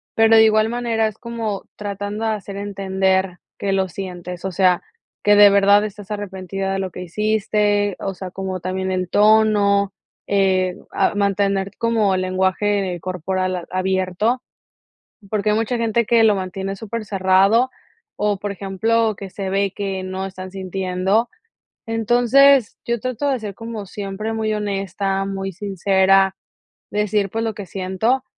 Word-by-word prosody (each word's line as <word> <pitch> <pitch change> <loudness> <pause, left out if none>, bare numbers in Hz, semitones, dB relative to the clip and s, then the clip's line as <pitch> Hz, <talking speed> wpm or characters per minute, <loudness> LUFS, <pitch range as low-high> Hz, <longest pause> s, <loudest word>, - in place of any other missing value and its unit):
pero 225 0 +5
de 220 - +8
igual 215 0 +4
manera 230 -2 0
es 215 -1 -7
como 230 -4 -4
tratando 205 +1 -4
de 220 - +1
hacer 205 -2 -5
entender 190 -2 0 0.2
que 200 - -2
lo 190 -1 +1
sientes, 180 -1 -7
o 190 - -2
sea, 185 -1 +3 0.4
que 205 0 +5
de 205 0 +9
verdad 200 +1 +5
estás 210 0 -7
arrepentida 195 -1 -4
de 195 - -1
lo 190 -1 -3
que 180 - -8
hiciste, 205 +1 +1
o 195 - -3
sea, 185 0 -7
como 190 0 -4
también 190 +1 -2
el 185 -1 -2
tono, 205 -1 +4 0.4
eh, 190 -2 +2 0.2
a - - +1
mantener 200 -1 +1
como 225 -4 +2
el 185 - 0
lenguaje 190 0 0
corporal 185 +1 -2
a 175 - -7
abierto, 190 +5 0 0.9
porque 210 0 0
hay 210 - +2
mucha 225 +2 0
gente 230 0 +1
que 230 0 +4
lo 215 - +5
mantiene 190 +1 -4
supercerrado 200 +2 +2 0.5
o, 210 -1 0
por 205 +1 -4
ejemplo, 215 +4 0
que 195 - -7
se 195 0 -4
ve 195 0 0
que 195 -2 -3
no 185 +1 -4
están 185 -1 -8
sintiendo, 190 +3 -1 0.6
entonces, 245 +3 +4
yo 235 -1 -1
trato 255 +3 -2
de 270 -3 +1
ser, 210 -3 -6
como 225 -3 -7
siempre, 205 +2 -5
muy 220 -1 -1
honesta, 195 -1 -2
muy 195 0 -4
sincera, 195 0 +2 0.6
decir, 210 -1 0
pues 225 +4 -3
lo 225 - -2
que 205 -1 -7
siento, 195 +8 -1
200 Hz, 155 wpm, -20 LUFS, 190-215 Hz, 0.9 s, de